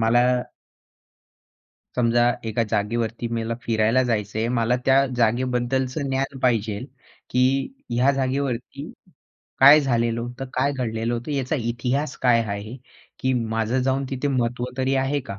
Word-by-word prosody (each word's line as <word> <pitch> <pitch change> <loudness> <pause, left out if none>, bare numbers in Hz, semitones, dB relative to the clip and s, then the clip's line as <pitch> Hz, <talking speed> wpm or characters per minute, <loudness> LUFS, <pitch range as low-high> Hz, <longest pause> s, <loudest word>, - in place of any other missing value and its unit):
मला 120 +2 +4 1.7
समजा 120 0 +3 0.2
एका 115 +1 0
जागेवरती 115 +2 -1
मेल 115 0 -2
फिरायला 115 +3 +2
जायचं 110 -4 -2
आहे 115 +1 0
मला 120 0 +1
त्या 135 +1 +5
जागेबद्दलचं 125 +3 0
ज्ञान 135 0 -2
पाहिजेल, 115 -1 0 0.4
की 130 +2 +2 0.2
ह्या 125 +3 +3
जागेवरती 135 +1 -3 0.7
काय 145 +3 +9
झालेलं 115 -3 0
होतं? 125 +2 -6
काय 135 +2 +1
घडलेलं 115 -3 -2
होतं? 120 +5 -5
याचा 140 +2 -1
इतिहास 125 +5 -2
काय 120 -2 +4
आहे? 105 +3 -5 0.4
की 130 - +1
माझं 115 +1 0
जाऊन 135 +1 0
तिथे 135 +1 -2
महत्व 125 -2 -1
तरी 130 +1 0
आहे 135 +2 0
का? 100 - -6
125 Hz, 135 wpm, -23 LUFS, 115-130 Hz, 1.7 s, काय